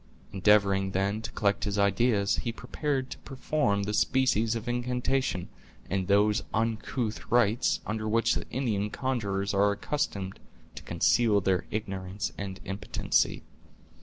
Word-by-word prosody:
Endeavoring, 100 -1 +3
then, 100 +3 0
to - - -6
collect 100 -2 +1
his 105 -1 -1
ideas, 100 +1 +2
he 120 - -2
prepared 130 +2 -3
to - - -7
perform 135 -7 -1
that 105 +1 -2
species 115 -1 +2
of 115 +1 -5
incantation, 125 -4 -1 0.4
and 95 -1 0
those 105 +1 +3
uncouth 115 0 -2
rites, 120 0 +2
under 110 0 -2
which 115 +1 +3
the - - -4
Indian 110 -5 -1
conjurers 100 -7 -2
are 100 +1 +4
accustomed 100 -5 -3 0.3
to - - -9
conceal 105 +5 +3
their 95 -1 0
ignorance 100 -2 -4
and 95 -1 -6
impotency. 100 +1 0
105 Hz, 135 wpm, -28 LUFS, 100-120 Hz, 0.4 s, are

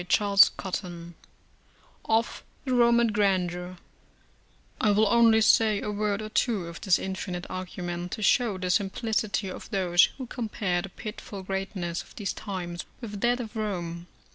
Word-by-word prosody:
CHAPTER 205 0 +6
XXIV 175 -3 -5 0.9
OF 225 +1 0 0.2
THE 260 - 0
ROMAN 235 -1 +4
GRANDEUR 185 -3 0 1.0
I 215 - +3
will 210 +2 +4
only 225 0 +5
say 215 -1 +4
a 210 - -3
word 210 0 -1
or 215 - -6
two 215 -4 0
of 170 0 -9
this 190 -3 +4
infinite 190 -2 -4
argument, 180 -1 -5
to 215 - -4
show 225 -1 +3
the 185 -1 -1
simplicity 205 +1 0
of 185 - -8
those 180 -3 +4
who 260 - -5
compare 210 -7 -2
the 195 - -7
pitiful 205 -1 -8
greatness 190 -3 -3
of - - -17
these 205 -4 -3
times 175 -4 -5
with 210 -4 -7
that 245 +1 +2
of 230 -1 -6
Rome. 175 -5 -4
200 Hz, 150 wpm, -27 LUFS, 180-220 Hz, 1.0 s, CHAPTER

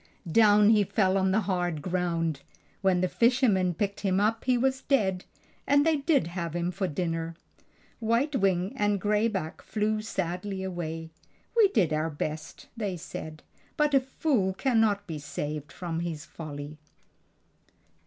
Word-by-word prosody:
Down 210 +1 +6
he 210 -2 +5
fell 190 -1 +1
on 190 -1 +2
the 205 +4 +2
hard 175 -6 -1
ground. 170 -4 -1 0.4
When 190 -2 +3
the 185 - +2
fishermen 220 - +2
picked 200 +3 -2
him 190 -2 +1
up 220 +2 +1
he 250 -1 +3
was 265 +2 +1
dead 190 -10 +1 0.4
and 285 +1 +4
they 320 -1 +3
did 280 -1 +2
have 170 -1 -4
him 175 +1 -1
for 190 +1 -2
dinner. 165 0 -3 0.6
White 235 +6 +1
Wings 190 -4 +1
and 205 -1 +1
Gray 210 +3 +2
Back 190 -8 -4
flew 215 0 -1
sadly 190 -1 -3
away. 165 -3 -5 0.4
"We 450 -3 +7
did 190 - +1
our 155 +1 0
best," 150 -1 -5
they 205 -6 -3
said; 155 -1 -8 0.3
"but 300 -1 +2
a 275 - +7
fool 260 -7 0
cannot 225 -4 +2
be 160 -3 -5
saved 150 +1 -5
from 170 -2 -4
his 170 -2 -4
folly." 150 -2 -8
190 Hz, 155 wpm, -28 LUFS, 165-220 Hz, 0.6 s, We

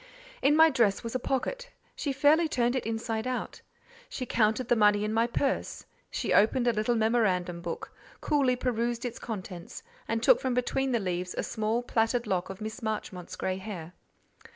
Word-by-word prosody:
In 280 +3 +4
my 320 0 +7
dress 225 -7 +2
was 230 - -5
a 255 - 0
pocket; - - -2 0.3
she 285 - -2
fairly 295 +5 +4
turned 245 -4 +1
it 255 - -2
inside 225 +1 -2
out: 255 -1 -4 0.5
she 255 - -4
counted 225 +1 +1
the 240 - +4
money 210 -1 +4
in 215 +1 -1
my 230 +1 +2
purse; 270 +3 -2 0.2
she - - -1
opened 240 +4 +4
a 240 - +4
little 215 +3 +1
memorandum 195 -6 +1
book, 170 -1 -6 0.3
coolly 275 -4 +2
perused 240 -1 -1
its 240 -1 -4
contents, 185 -5 -7 0.2
and 225 0 -1
took - - +6
from 260 -2 0
between 265 +2 0
the 235 - +2
leaves 180 -2 -3
a - - 0
small 220 +2 -1
plaited 235 +1 +1
lock 185 -3 -1
of 195 +2 -8
Miss 215 +1 -6
Marchmont's 195 -5 -4
grey 185 0 -2
hair. 185 -4 -7
230 Hz, 180 wpm, -29 LUFS, 210-250 Hz, 0.5 s, my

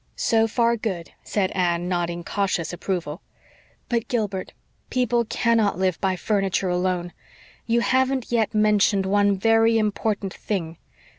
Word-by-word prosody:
"So 225 0 +2
far, 235 +1 +1
good," 190 -7 -4
said 195 -3 -1
Anne, 175 -1 0
nodding 175 -1 -2
cautious 185 -3 -1
approval. 175 -2 -4 0.7
"But, 235 -2 -1
Gilbert, 210 -7 -2 0.4
people 245 -2 +1
cannot 225 -3 +1
live 185 -2 0
by 190 -1 +1
furniture 195 -1 0
alone. 180 -1 -1 0.5
You 235 0 +2
haven't 260 0 +1
yet 225 -2 +1
mentioned 210 -2 +3
one 200 0 +2
very 225 +2 +4
important 210 -2 -1
thing. 170 -6 -4
200 Hz, 130 wpm, -23 LUFS, 185-225 Hz, 0.7 s, very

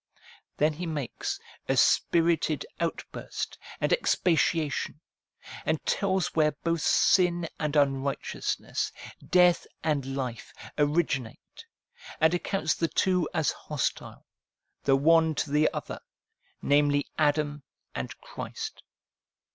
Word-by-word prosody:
Then 150 +1 +3
he 170 +3 -5
makes 145 -6 -3 0.3
a - - +2
spirited 165 -2 +3
outburst 170 -1 -4 0.2
and - - +2
expatiation, 165 - +1 0.6
and - - 0
tells 190 -3 0
where 155 -2 +3
both 165 -1 0
sin 175 +1 +3
and 150 -1 -1
unrighteousness, 140 -1 0 0.3
death 180 -1 +4 0.2
and 140 -4 -1
life, 125 -4 -5 0.2
originate, 145 -5 -1 0.5
and 160 +2 +4
accounts 175 -2 0
the 165 - 0
two 180 -1 +1
as 160 -4 +1
hostile 150 -3 -4 0.6
the 135 - +5
one 160 +2 +4
to 140 - -2
the 150 +1 +4
other, - - -5 0.6
namely 145 0 +3
Adam 145 -1 +1 0.3
and - - -5
Christ. 460 -2 -7
155 Hz, 105 wpm, -28 LUFS, 145-170 Hz, 0.6 s, the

